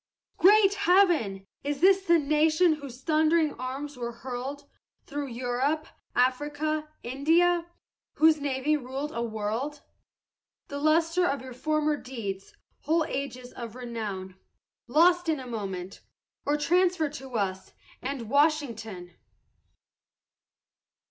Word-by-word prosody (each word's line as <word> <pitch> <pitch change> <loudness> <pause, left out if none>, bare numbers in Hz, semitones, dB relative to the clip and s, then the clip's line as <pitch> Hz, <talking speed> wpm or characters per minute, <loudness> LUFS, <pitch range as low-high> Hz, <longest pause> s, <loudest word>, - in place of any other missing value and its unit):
Great 400 +1 +6
Heaven! 355 - +3 0.2
is 285 0 -2
this 385 +2 +5
the 340 -3 +4
nation 310 +3 +3
whose 275 -4 -9
thundering 315 0 +3
arms 270 +2 -5
were 240 -1 -4
hurled, 260 +4 -6 0.4
Through 290 -1 -4
Europe, 255 +5 -1 0.3
Afric, 260 +4 +1 0.4
India? 335 +7 +2 0.5
whose 315 -1 +4
navy 280 +1 +1
ruled 275 +2 -4
a 235 - -3
world? 230 +6 -3 0.9
The 285 - -4
lustre 330 +4 +3
of 275 -4 -2
your 260 -1 -8
former 305 +3 0
deeds, 210 -8 -6 0.2
whole 320 +2 +1
ages 255 -3 -5
of 235 -1 -7
renown, 210 -7 -5 0.5
Lost 345 +6 +4
in 310 -3 +1
a 260 - -7
moment, 195 -6 -5 0.5
or 295 +1 +2
transferred 345 -1 +2
to 265 -3 -8
us 190 -2 -3 0.3
and 260 -3 -4
Washington! 230 - 0
280 Hz, 115 wpm, -28 LUFS, 245-315 Hz, 0.9 s, Great